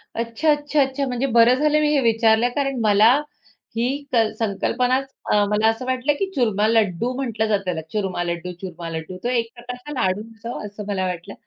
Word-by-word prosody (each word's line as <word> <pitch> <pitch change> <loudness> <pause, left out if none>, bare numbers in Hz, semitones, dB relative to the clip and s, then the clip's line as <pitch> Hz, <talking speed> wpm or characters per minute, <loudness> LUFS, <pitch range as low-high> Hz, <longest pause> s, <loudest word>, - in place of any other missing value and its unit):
अच्छा, 230 +7 -1
अच्छा, 295 0 +1
अच्छा. 270 +1 0
म्हणजे 250 +1 -1
बरं 235 +1 +6
झालं 300 +2 +2
मी 300 - +2
हे 290 - +3
विचारलं 225 0 +3
कारण 275 -2 -1
मला 215 +1 +5 0.6
ही 235 +2 +1 0.3
क - - +2 0.2
संकल्पनाच 250 +5 0 0.4
मला 210 +1 +2
अ, - - +6
असं 225 +3 -3
वाटलं, 260 +3 +1
की 390 - +1
चूरमा 215 -5 +2
लड्डू 220 0 +1
म्हटलं 230 -5 -1
जातं 205 -2 +1
त्याला 175 -3 -2
चूरमा 190 -4 -1
लड्डू, 170 +1 -4
चूरमा 175 -3 -6
लड्डू. 165 +3 -6
तो 240 - 0
एक 230 -2 0
प्रकारचा 250 +3 -8
लाडू 185 +2 +1
असावा 230 +1 -6
असं 205 0 -8
मला 190 -2 -1
वाटलं. 175 -2 -5
230 Hz, 190 wpm, -22 LUFS, 200-255 Hz, 0.6 s, बरं